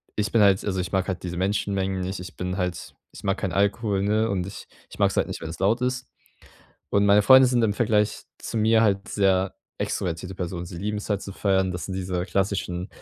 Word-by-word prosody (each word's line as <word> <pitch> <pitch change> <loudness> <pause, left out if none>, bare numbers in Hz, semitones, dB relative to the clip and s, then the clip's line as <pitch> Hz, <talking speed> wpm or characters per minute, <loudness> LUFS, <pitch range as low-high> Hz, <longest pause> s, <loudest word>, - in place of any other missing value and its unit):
ich 105 -1 -1
bin 115 - +4
halt 100 -2 +4
also, 95 -2 -1
ich 90 -2 -3
mag 95 -1 0
halt 95 -1 -3
diese 90 -1 -4
Menschenmengen 95 0 -1
nicht. 95 +2 -4
Ich 90 - -9
bin 90 +1 -3
halt 90 -2 -3 0.2
ich - - -12
mag 95 0 0
keinen 95 - -2
Alkohol, 100 +1 +1
ne, 110 +2 +1
und 95 -3 -1
ich 100 - -9 0.2
ich - - -12
mag's - - +3
halt - - +2
nicht, - - -6
wenn 80 - -5
es 80 - -8
laut 105 +6 +2
ist. 125 0 -1 0.8
Und 100 0 +3
meine 100 +1 +6
Freunde 130 +4 +8
sind 125 -1 +2
im 110 -2 +2
Vergleich 105 -2 +1 0.2
zu - - -6
mir 110 +1 +4
halt 100 -3 +1
sehr 95 -1 +1 0.2
extrovertierte 90 +2 -3
Personen. 90 -1 -4
Sie 85 0 -8
lieben's 105 +2 -3
halt 100 -1 0
zu 100 - -7
feiern. 95 -1 +1
Das 90 - -5
sind 95 - -5
diese 90 -1 -2
klassischen 95 -1 -2
95 Hz, 225 wpm, -25 LUFS, 90-105 Hz, 0.8 s, Freunde